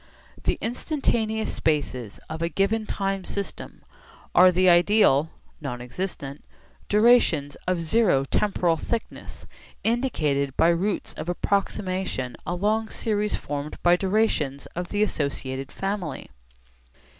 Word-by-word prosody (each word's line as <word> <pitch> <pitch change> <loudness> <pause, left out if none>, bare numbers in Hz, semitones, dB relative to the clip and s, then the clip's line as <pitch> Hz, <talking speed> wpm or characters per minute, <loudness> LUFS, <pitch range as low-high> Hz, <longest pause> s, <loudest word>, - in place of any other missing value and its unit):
The - - +1
instantaneous 225 -3 -1
spaces 130 -8 -1
of 160 - -6
a 165 - 0
given 210 +4 0
time 195 -1 -2
system 200 +1 -6 0.5
are 185 +1 +7
the 185 +1 +3
ideal 175 -4 +5 0.3
(non 125 -4 -4
existent) 140 +1 -5 0.5
durations 210 -10 +4
of 180 -2 0
zero 165 -6 +3
temporal 175 0 +1
thickness 230 +7 -5 0.4
indicated 150 - 0
by 165 - +5
routes 185 +4 0
of 165 - -6
approximation 185 - -1
along 210 +5 0
series 210 -2 -1
formed 145 +1 -5
by 175 0 +6
durations 185 -8 0
of 175 +1 -3
the 205 0 +1
associated 135 -6 -3
family. 195 - -4
180 Hz, 110 wpm, -25 LUFS, 145-210 Hz, 0.5 s, are